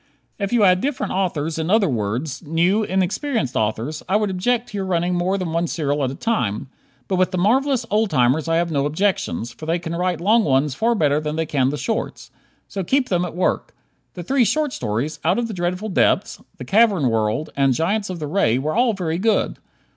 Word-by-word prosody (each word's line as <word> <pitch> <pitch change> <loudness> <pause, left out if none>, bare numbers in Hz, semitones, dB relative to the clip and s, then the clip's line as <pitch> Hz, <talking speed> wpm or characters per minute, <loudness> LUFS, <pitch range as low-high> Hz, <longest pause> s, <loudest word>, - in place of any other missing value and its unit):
If 200 -1 -2
you 240 -3 +3
had 185 -1 +4
different 280 0 -2
authors, 165 -4 -1
in 160 +1 -2
other 210 0 +4
words, 120 +3 -2
new, 170 +6 +1
inexperienced 190 - -1
authors, 110 +8 -1
I 190 - +2
would 210 -2 +1
object 240 +6 0
to 205 - -6
your 190 - -2
running 175 0 0
more 180 +2 0
than 180 -4 -3
one 170 +1 0
serial 145 -3 -1
at 130 - 0
a 135 - -6
time, 135 - -1 0.4
but 190 - 0
with 185 0 +3
the 185 - -3
marvelous 250 +6 +2
old 215 0 +2
timers 135 +1 +2
I 165 - +1
have 170 0 0
no 140 -2 +1
objections, 190 - -1
for 155 +6 -10
they 165 +2 +1
can 170 -1 -5
write 180 0 -1
long 215 +6 +3
ones 140 -1 +2
far 230 - +1
better 150 -7 +2
than 155 0 -3
they 160 0 -1
can 135 -4 +1
the 145 - -3
shorts. 150 - -4 0.4
So 195 - -4
keep 265 +7 +1
them 180 -2 +1
at 175 -2 -5
work. 180 - -1 0.4
The 175 - -6
three 265 +7 +2
short 300 +3 0
stories, 120 +9 -3
"Out 175 +4 +2
of 240 -1 0
the 220 - -6
Dreadful 180 +3 -2
Depths," 190 - +1 0.2
"The - - -7
Cavern 200 - +3
World" 110 +5 0
and 135 -1 +3
"Giants 200 - 0
of 185 - -4
the 155 - -4
Ray," 145 - +1
were 150 +4 -2
all 240 0 +3
very 170 -4 -2
good. 220 +2 +1
175 Hz, 220 wpm, -21 LUFS, 150-205 Hz, 0.4 s, had